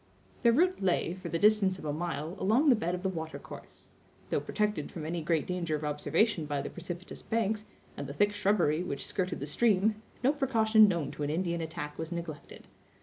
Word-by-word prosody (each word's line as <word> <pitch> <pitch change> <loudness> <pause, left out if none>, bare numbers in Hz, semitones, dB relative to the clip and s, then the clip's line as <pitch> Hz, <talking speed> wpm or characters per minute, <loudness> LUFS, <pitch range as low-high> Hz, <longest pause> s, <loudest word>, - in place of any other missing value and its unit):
Their 235 - +5
route 360 - +2
lay, 175 -2 +1
for 185 -2 -7
the 165 - 0
distance 205 -1 +4
of 155 - -10
a 145 - -1
mile, 160 0 -3
along 240 +10 +3
the 255 - +7
bed 175 -4 -1
of 180 - -7
the - - +1
water 160 -3 -5
course. - - -12 0.4
Though - - +2
protected 210 -8 -1
from 160 -3 -7
any 165 +1 -2
great 160 -1 +1
danger 175 -3 -1
of 150 - -5
observation 150 +4 +1
by 145 -1 -2
the - - -5
precipitous 175 +1 -7
banks, 220 -1 -1 0.3
and 140 - -5
the 140 - -6
thick 205 +6 +3
shrubbery 190 -6 +2
which 140 -6 -3
skirted 185 -2 -2
the 140 - -3
stream, 210 +5 +2 0.2
no 270 +4 +4
precaution 225 -6 +5
known 170 -7 -1
to - - -9
an 145 - 0
Indian 170 +1 -1
attack 150 -2 -6
was 160 +1 -4
neglected. 170 -3 -7
180 Hz, 205 wpm, -30 LUFS, 160-210 Hz, 0.4 s, the